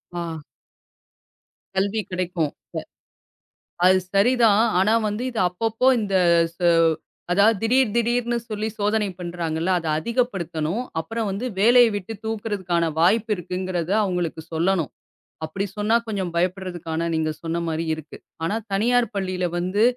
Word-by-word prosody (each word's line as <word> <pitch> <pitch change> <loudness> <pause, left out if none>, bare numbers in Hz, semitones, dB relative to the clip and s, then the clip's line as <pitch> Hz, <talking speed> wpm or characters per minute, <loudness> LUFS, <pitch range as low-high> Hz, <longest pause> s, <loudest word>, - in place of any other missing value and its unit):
ஆ. 170 -2 -4 1.4
கல்வி 200 +3 +1 0.3
கிடைக்கும்.அப்ப - - -16 1.5
அது 185 0 +6 0.2
சரிதான். 220 0 +4 0.2
ஆனா 195 +4 +3 0.2
வந்து 210 +4 -3
இது 235 - -5
அப்பப்போ 225 +7 -1
இந்த 200 -2 -2 0.4
ச - - -39 0.7
அதாவது 205 +4 +5
திடீர் 245 -1 +3
திடீர்னு 240 0 +1
சொல்லி 215 +1 -2
சோதனை 210 0 +1
பண்றாங்கல்ல. 170 -1 -2
அதை 165 -2 -4
அதிகப்படுத்தணும். 190 -4 -1 0.2
அப்புறம் 225 +6 -3
வந்து 200 +6 -3
வேலைய 240 +3 +6
விட்டுத் 205 +2 -7
தூக்குறதுக்கான 200 -6 -1 0.2
வாய்ப்பு 215 +6 +3
இருக்குங்கிறத 180 0 -3
அவங்களுக்கு 180 -4 -2
சொல்லணும். 170 0 +1 0.6
அப்படி 195 +6 -3
சொன்னா 210 +2 +2
கொஞ்சம் 195 -5 -2
பயப்படுறதுக்கான 175 -2 -2
நீங்கச் 155 -1 -2
சொன்ன 165 +1 -2
மாரி 165 +1 -2
இருக்கு. 155 -1 -10 0.3
ஆனா 165 +6 0 0.2
தனியார் 240 +4 +3
பள்ளியில 185 -2 -1
வந்து 185 +5 +1
195 Hz, 120 wpm, -23 LUFS, 170-220 Hz, 1.5 s, அது